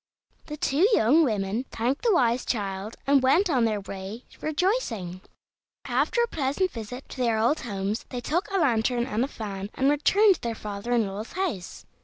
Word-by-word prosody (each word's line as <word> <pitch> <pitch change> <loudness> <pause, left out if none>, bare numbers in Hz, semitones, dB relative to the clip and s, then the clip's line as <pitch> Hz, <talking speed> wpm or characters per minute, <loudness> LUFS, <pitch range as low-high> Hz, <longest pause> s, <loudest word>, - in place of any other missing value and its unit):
The 300 -1 -6
two 305 +6 +3
young 280 +9 +5
women 215 -1 -1
thanked 245 +5 -1
the 470 - +3
wise 245 -3 +2
child, 200 -1 -3
and 275 -1 +4
went 335 +8 +3
on 250 -5 +3
their 215 -2 0
way 195 +4 -7 0.2
rejoicing. 300 - -1 0.6
After 475 - +1
a - - 0
pleasant 320 - -1
visit 240 +3 -7
to - - -9
their 235 -3 +1
old 235 +8 +2
homes, 205 -2 -3
they 250 - -4
took 345 - -1
a 390 - 0
lantern 240 -5 +2
and 220 +2 -1
a - - 0
fan, 200 -6 -6
and 270 +2 +3
returned 390 +8 +4
to - - -11
their 230 -1 -3
father 210 +2 -6
in 235 -3 +3
law's 200 +3 -6
house. 335 - -4
240 Hz, 185 wpm, -26 LUFS, 210-300 Hz, 0.6 s, young